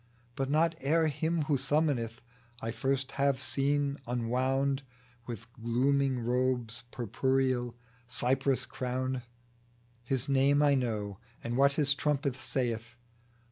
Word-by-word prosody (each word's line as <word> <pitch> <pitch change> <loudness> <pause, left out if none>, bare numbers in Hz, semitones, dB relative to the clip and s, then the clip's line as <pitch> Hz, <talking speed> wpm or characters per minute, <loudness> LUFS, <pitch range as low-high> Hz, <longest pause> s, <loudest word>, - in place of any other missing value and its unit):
But 135 -1 -1
not 160 +3 +3
ere 160 +3 +3
him 160 +2 0
who 145 -2 +1
summoneth 135 -6 0 0.4
I 115 -3 -3
first 135 +3 -1
have 140 -2 +3
seen, 140 +1 0
enwound 130 +3 +1 0.5
With 115 -2 -6
glooming 130 +3 +1
robes 125 -1 0
purpureal, 130 +1 0 0.3
cypress 130 +2 +1
crowned; 130 0 -2 0.8
His 130 +2 -1
name 140 +1 +4
I 145 -1 +5
know, 110 -7 -1 0.2
and 120 +1 -2
what 140 +2 +5
his 145 -1 +3
trumpet 140 -2 0
saith. 120 -3 -2
130 Hz, 115 wpm, -31 LUFS, 120-140 Hz, 0.8 s, I